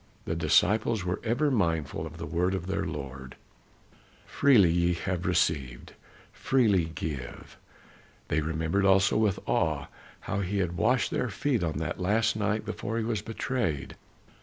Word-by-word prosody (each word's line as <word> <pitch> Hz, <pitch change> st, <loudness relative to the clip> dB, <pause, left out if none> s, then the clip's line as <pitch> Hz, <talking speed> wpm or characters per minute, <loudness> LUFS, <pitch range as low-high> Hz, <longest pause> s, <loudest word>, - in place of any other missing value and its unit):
The -, -, -2 dB
disciples 110 Hz, 0 st, +2 dB
were 90 Hz, 0 st, -2 dB
ever 130 Hz, +6 st, +1 dB
mindful 80 Hz, -, 0 dB
of 80 Hz, +1 st, -11 dB
the -, -, -5 dB
word 90 Hz, +2 st, 0 dB
of 90 Hz, -2 st, -4 dB
their 95 Hz, +1 st, -2 dB
Lord, 65 Hz, -1 st, -7 dB, 0.9 s
"Freely 115 Hz, -12 st, +4 dB
ye 85 Hz, +1 st, +2 dB
have 90 Hz, +2 st, -3 dB
received, 65 Hz, -8 st, 0 dB, 0.4 s
freely 105 Hz, -10 st, +2 dB
give." 80 Hz, -6 st, -6 dB, 0.7 s
They 80 Hz, -, +1 dB
remembered 80 Hz, +5 st, -1 dB
also 95 Hz, 0 st, +4 dB
with 105 Hz, -3 st, +2 dB
awe 75 Hz, -4 st, 0 dB, 0.3 s
how 100 Hz, -, -3 dB
he 100 Hz, +1 st, -2 dB
had 90 Hz, -3 st, 0 dB
washed 120 Hz, +8 st, +2 dB
their 125 Hz, -, -1 dB
feet 125 Hz, 0 st, -1 dB
on 80 Hz, -3 st, -2 dB
that 80 Hz, +2 st, -3 dB
last 105 Hz, +5 st, +1 dB
night 105 Hz, 0 st, -1 dB
before 110 Hz, +1 st, -4 dB
he 115 Hz, -, 0 dB
was 110 Hz, -2 st, -1 dB
betrayed. 115 Hz, -, -3 dB
95 Hz, 150 wpm, -28 LUFS, 80-110 Hz, 0.9 s, Freely